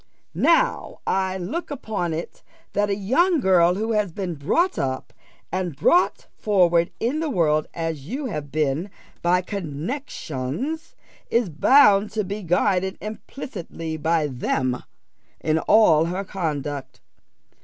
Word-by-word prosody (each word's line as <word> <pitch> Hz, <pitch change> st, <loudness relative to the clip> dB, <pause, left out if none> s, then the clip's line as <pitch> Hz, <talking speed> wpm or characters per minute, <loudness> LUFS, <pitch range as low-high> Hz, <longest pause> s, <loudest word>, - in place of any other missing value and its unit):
"Now -, -, +2 dB
I 190 Hz, 0 st, 0 dB
look 205 Hz, -, -4 dB
upon 220 Hz, -, -3 dB
it 160 Hz, +2 st, -5 dB, 0.3 s
that 205 Hz, 0 st, +1 dB
a 200 Hz, -, +1 dB
young 300 Hz, -, +2 dB
girl 180 Hz, -5 st, +4 dB
who 220 Hz, +3 st, -1 dB
has 210 Hz, -4 st, +1 dB
been 180 Hz, 0 st, -4 dB
brought 250 Hz, -, +1 dB
up, 130 Hz, -1 st, -3 dB, 0.4 s
and 180 Hz, -5 st, -2 dB
brought 345 Hz, -, +3 dB
forward 175 Hz, -5 st, +3 dB
in 260 Hz, +7 st, 0 dB
the 320 Hz, -1 st, -1 dB
world 155 Hz, -, +2 dB
as 165 Hz, -4 st, -3 dB
you 270 Hz, -, -4 dB
have 150 Hz, -, -4 dB
been 155 Hz, +4 st, 0 dB, 0.3 s
by 180 Hz, +1 st, +2 dB
connexions, 185 Hz, -, -4 dB, 0.3 s
is 235 Hz, -5 st, +2 dB
bound 205 Hz, -, +5 dB
to 215 Hz, -1 st, 0 dB
be 200 Hz, +2 st, -5 dB
guided 190 Hz, +1 st, +1 dB
implicitly 195 Hz, -7 st, -6 dB
by 160 Hz, 0 st, +1 dB
them 130 Hz, -1 st, -1 dB, 0.6 s
in 155 Hz, 0 st, +1 dB
all 165 Hz, -6 st, +5 dB
her 180 Hz, +4 st, -2 dB
conduct. 150 Hz, -7 st, -4 dB
185 Hz, 130 wpm, -23 LUFS, 160-215 Hz, 0.6 s, bound